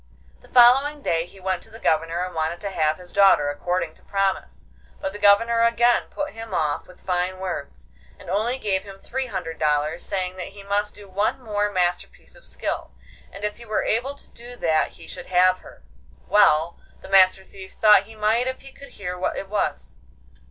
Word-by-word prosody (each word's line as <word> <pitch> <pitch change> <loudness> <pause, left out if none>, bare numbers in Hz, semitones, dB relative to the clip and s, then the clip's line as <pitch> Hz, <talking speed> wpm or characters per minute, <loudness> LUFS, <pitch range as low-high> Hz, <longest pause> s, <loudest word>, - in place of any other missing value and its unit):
The - - -20
following 270 +4 +5
day 165 0 0
he 195 - -17
went 185 -1 -2
to - - -15
the 225 - -12
Governor 165 -1 0
and 185 - -8
wanted 160 +2 -2
to 200 -1 -4
have 155 -3 +1
his 180 -1 -9
daughter 190 -8 +5
according 170 +2 -2
to - - -16
promise. 195 -1 -2 0.3
But 190 - -4
the 205 - -8
Governor 230 +3 +4
again 235 +1 +3
put 295 0 -4
him 225 0 -7
off 155 -3 -1
with 180 - -18
fine 180 0 -1
words, 180 -7 -6 0.3
and - - -15
only 215 +8 0
gave 200 -6 -1
him 195 -1 -11
three 260 +6 -4
hundred 180 -7 -5
dollars, 150 +2 0
saying 185 -1 -3
that 185 +1 -7
he 200 - -10
must 205 +1 -1
do 205 -1 -12
one 200 +6 -1
more 210 -4 -1
masterpiece 180 -2 -2
of - - -17
skill, - - -5 0.4
and 200 - -10
if 210 0 -2
he 235 - -12
were 215 - 0
but - - +1
able 255 +6 -1
to - - -13
do 240 +1 -10
that 160 -8 +1
he 165 - -13
should - - -8
have 185 0 +4
her. - - -16 0.4
Well, 170 -5 +3 0.2
the - - -11
Master 190 0 +5
Thief 190 0 -12
thought 210 -2 +5
he 220 +1 -13
might 220 +4 +1
if 260 0 -4
he 270 - -12
could 280 - -14
hear 180 -3 -5
what 180 - -2
it 195 - -6
was. 205 - -2
195 Hz, 210 wpm, -23 LUFS, 180-220 Hz, 0.4 s, following